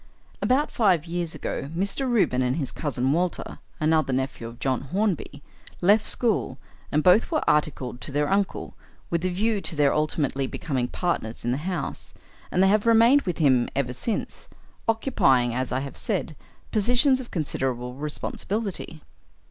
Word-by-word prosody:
"About 270 +4 +2
five 185 - +2
years 170 -1 -3
ago 140 - -4
Mr. 200 +8 -1
Reuben 195 - +2
and 125 0 +1
his 145 -5 -2
cousin 135 -3 -1
Walter 175 +3 -1 0.2
another 155 -2 +2
nephew 130 -2 -2
of 115 +1 -10
John 130 -1 -1
Hornby 165 -2 -2 0.4
left 205 +4 +4
school, 215 - +2 0.3
and 150 +1 +2
both 185 +5 +5
were 310 -3 -1
articled 140 -5 0
to - - -6
their 145 +1 +1
uncle, 195 0 -1 0.4
with 170 -1 +1
the 185 - 0
view 205 +3 0
to 165 - -5
their 145 -2 +3
ultimately 145 -3 0
becoming 130 -5 -2
partners 125 -13 -3
in 120 - +1
the 125 - 0
house; 170 -7 -5 0.3
and 185 - +2
they - - +5
have 210 +3 +2
remained 230 +5 +6
with 175 - -2
him 130 -6 +3
ever 130 -2 -1
since, 210 - -4 0.4
occupying, 135 - +2
as 130 +1 -2
I 130 +1 0
have 140 0 -6
said, 185 -7 -2 0.4
positions 245 +5 +3
of 255 - -8
considerable 130 -6 -2
responsibility. 160 - -4
160 Hz, 160 wpm, -25 LUFS, 135-205 Hz, 0.4 s, remained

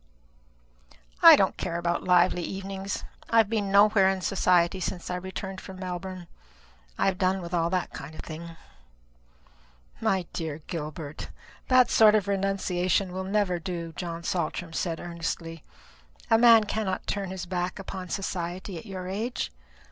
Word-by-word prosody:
"I - - +11
don't - - +1
care 170 - -3
about 170 0 -1
lively 180 0 +4
evenings. 195 +2 -4 0.3
I 230 - +2
have 220 -1 +4
been 205 -3 0
nowhere 200 -1 +6
in 190 -1 -1
society 180 -1 +2
since 180 0 -4
I - - -1
returned 190 +1 -6
from 190 - -10
Melbourne. 185 0 -6 0.7
I - - +1
have 190 -2 +1
done 190 +1 +2
with 175 -1 -7
all 170 -1 +1
that 185 0 -2
kind 145 +3 -8
of - - -6
thing." 165 +1 -8 1.4
"My 190 -2 +1
dear 160 -2 -4
Gilbert, 155 -2 -6 0.4
that 255 -1 +5
sort 215 -1 +6
of 205 -2 +1
renunciation 195 -2 0
will 190 0 -3
never 195 -3 0
do," 170 -2 -5
John 170 -1 -5
Saltram 175 -1 -2
said 165 -1 -2
earnestly. 165 -1 -5 0.7
"A 225 - +7
man 230 -2 +8
cannot 205 -3 -2
turn 200 -2 -2
his 185 -1 -5
back 180 0 -3
upon 190 -1 -7
society 180 -1 -4
at 225 - -13
your 185 -2 -6
age. 210 - -3
185 Hz, 155 wpm, -27 LUFS, 170-195 Hz, 1.4 s, I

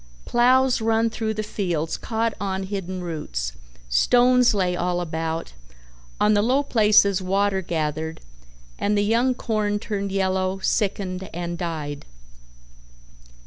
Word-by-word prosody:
Plows 255 +1 +3
run 225 0 +2
through 220 -1 -2
the 215 - -2
fields 175 -7 -2
caught 225 -1 -1
on 190 -1 -2
hidden 190 -2 -4
roots, - - -4 0.3
stones 245 - +4
lay 180 -3 +1
all 175 0 -1
about, 165 -1 -3 0.7
on 210 0 +4
the 205 - +3
low 260 +6 +2
places 210 -6 +4
water 195 +1 +1
gathered, 160 -2 -3 0.6
and 210 0 +1
the 205 - +2
young 240 +4 +2
corn 210 -3 -1
turned 200 -2 -3
yellow, 190 -1 0
sickened 190 -2 -1
and 175 0 -3
died. 155 - -5
195 Hz, 125 wpm, -23 LUFS, 175-220 Hz, 0.7 s, stones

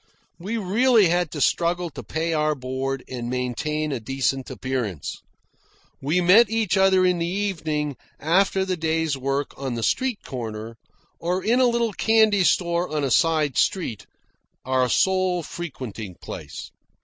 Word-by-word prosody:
We 205 +7 -3
really 220 0 +4
had 175 -1 +1
to 150 - -6
struggle 170 +2 +1
to - - -8
pay 165 +1 -2
our 155 -1 +1
board 130 0 -3
and 120 -2 -5
maintain 135 +5 -2
a 130 - -2
decent 135 +2 -2
appearance. 120 - -4 0.8
We 155 +7 +1
met 200 +6 +6
each 220 -5 +1
other 190 -1 +4
in 180 -1 +2
the 170 - -1
evening, 160 -7 -2 0.2
after 190 +4 +2
the 185 -1 -1
day's 160 -2 0
work, 135 +1 -2
on 135 -3 -3
the 115 - -3
street 255 - 0
corner, 115 -3 -6 0.4
or 180 +2 -1
in 235 +4 +3
a 255 - +5
little 235 -2 0
candy 220 -2 +3
store 170 +1 +1
on 150 -1 -1
a 135 - 0
side 155 - +2
street, 165 - -1 0.6
our 130 -1 +1
sole 185 +2 +2
frequenting 125 - -7
place. - - -8
160 Hz, 150 wpm, -24 LUFS, 135-190 Hz, 0.8 s, met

